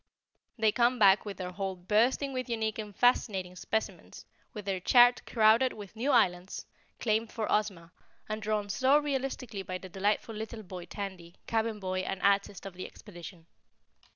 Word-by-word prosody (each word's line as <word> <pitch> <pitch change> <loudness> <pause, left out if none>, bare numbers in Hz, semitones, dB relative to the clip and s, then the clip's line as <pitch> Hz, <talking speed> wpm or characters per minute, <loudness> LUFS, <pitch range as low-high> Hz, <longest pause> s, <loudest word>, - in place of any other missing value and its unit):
They 220 -1 +3
come 240 +3 +2
back 200 -2 +5
with 200 -3 -6
their 180 -1 -5
hold 190 -1 -5
bursting 250 +6 +2
with 255 -1 -3
unique 220 -1 -1
and 210 -2 -6
fascinating 195 -7 +2
specimens, 220 +5 -4 0.3
with 210 -5 -8
their 195 -2 -1
chart 245 +5 +6
crowded 230 +3 +4
with 205 0 -10
new 240 +6 -1
islands, 185 -8 +2 0.3
claimed 220 0 0
for 220 - -2
Ozma, 190 -6 -1 0.4
and 215 0 -4
drawn 210 -1 -1
so 260 +8 +3
realistically 270 -7 -2
by 185 -1 -5
the 185 0 -11
delightful 205 +4 -1
little 220 +1 -6
boy 180 -2 -8
Tandy, 185 -4 -7
Cabin 225 -1 -1
Boy 185 -1 -2
and 185 0 -3
Artist 200 -1 +1
of 195 - -7
the 185 - -7
Expedition. 175 -4 -12
210 Hz, 165 wpm, -30 LUFS, 190-230 Hz, 0.4 s, chart